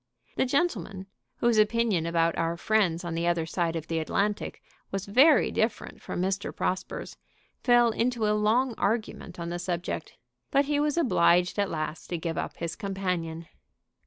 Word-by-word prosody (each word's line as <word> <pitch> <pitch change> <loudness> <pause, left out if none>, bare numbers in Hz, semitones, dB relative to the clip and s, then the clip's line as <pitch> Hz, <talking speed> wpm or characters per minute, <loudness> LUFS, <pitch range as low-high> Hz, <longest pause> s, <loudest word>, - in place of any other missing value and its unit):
The - - +1
gentleman, 225 - -1 0.3
whose 235 -2 +2
opinion 215 -5 +2
about 165 0 +1
our 165 0 -1
friends 185 -4 +1
on 170 -1 -4
the 170 +1 -1
other 170 -2 +1
side 170 0 -1
of 160 -2 -4
the 165 0 -1
Atlantic 200 +6 -1 0.3
was 195 0 -3
very 270 +10 +5
different 220 +1 -2
from - - -5
Mr. 190 +2 -1
Prosper's, 185 0 -3 0.5
fell 240 -1 +5
into 235 0 0
a 210 - +3
long 225 +4 +2
argument 205 -4 -2
on 170 0 -4
the 175 0 -3
subject. 175 -1 -3 0.4
But 280 0 +3
he 290 0 0
was 295 +1 0
obliged 180 - +3
at 200 - +1
last 155 0 -4
to 175 - -3
give 165 0 -3
up - - -5
his 170 -1 -4
companion. 180 -4 -3
190 Hz, 165 wpm, -27 LUFS, 170-230 Hz, 0.5 s, very